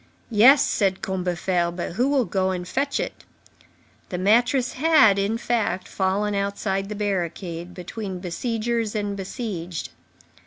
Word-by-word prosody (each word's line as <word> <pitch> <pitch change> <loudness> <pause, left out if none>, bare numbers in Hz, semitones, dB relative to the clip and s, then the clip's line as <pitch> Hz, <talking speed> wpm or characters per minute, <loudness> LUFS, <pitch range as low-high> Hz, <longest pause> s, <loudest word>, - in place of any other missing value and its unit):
"Yes," 245 +7 +7
said 190 -3 0
Combeferre, 180 -1 0
"but 175 0 -4
who 240 +9 +1
will 275 -4 +2
go 190 -2 0
and 180 -1 -3
fetch 280 +6 -1
it?" - - -5 0.9
The 180 - -3
mattress 240 +7 +3
had, 255 -9 +5
in 205 +3 0
fact, 225 -6 -1
fallen 200 +2 0
outside 200 0 -1
the 210 - -4
barricade, 180 -3 -3
between 190 +1 -6
besiegers 225 +5 -2
and 205 -1 -2
besieged. 190 - -5
200 Hz, 130 wpm, -24 LUFS, 185-230 Hz, 0.9 s, Yes